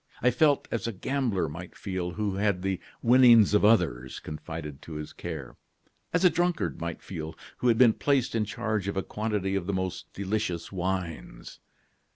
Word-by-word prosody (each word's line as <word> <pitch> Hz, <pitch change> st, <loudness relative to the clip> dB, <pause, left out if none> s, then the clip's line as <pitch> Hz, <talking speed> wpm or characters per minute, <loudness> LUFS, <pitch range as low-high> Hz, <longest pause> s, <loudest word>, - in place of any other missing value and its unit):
I 125 Hz, -, +3 dB
felt 145 Hz, +3 st, +3 dB
as 115 Hz, -, -2 dB
a -, -, -1 dB
gambler 115 Hz, -, -1 dB
might 85 Hz, +4 st, -8 dB
feel 95 Hz, -2 st, -3 dB
who 105 Hz, -1 st, -1 dB
had 100 Hz, -3 st, +1 dB
the 95 Hz, -2 st, -1 dB, 0.2 s
winnings 120 Hz, -4 st, +7 dB
of 105 Hz, -, +4 dB
others 85 Hz, -, +2 dB
confided 75 Hz, -2 st, -7 dB
to 80 Hz, -, -9 dB
his 75 Hz, 0 st, -6 dB
care; 80 Hz, -7 st, -7 dB, 0.5 s
as 180 Hz, +2 st, +2 dB
a -, -, +9 dB
drunkard 175 Hz, -, 0 dB
might 85 Hz, -1 st, -4 dB
feel 80 Hz, -3 st, -6 dB, 0.2 s
who 125 Hz, -, 0 dB
had 115 Hz, -2 st, +4 dB
been 120 Hz, -2 st, +6 dB
placed 140 Hz, -1 st, +1 dB
in 115 Hz, -1 st, +1 dB
charge 105 Hz, 0 st, -2 dB
of 100 Hz, -, -2 dB
a 95 Hz, -, 0 dB
quantity 105 Hz, -3 st, -2 dB
of 95 Hz, -3 st, -1 dB
the 100 Hz, -, -1 dB
most 95 Hz, -1 st, -3 dB
delicious 100 Hz, -4 st, -2 dB
wines. 90 Hz, -3 st, -4 dB
100 Hz, 180 wpm, -28 LUFS, 85-115 Hz, 0.5 s, a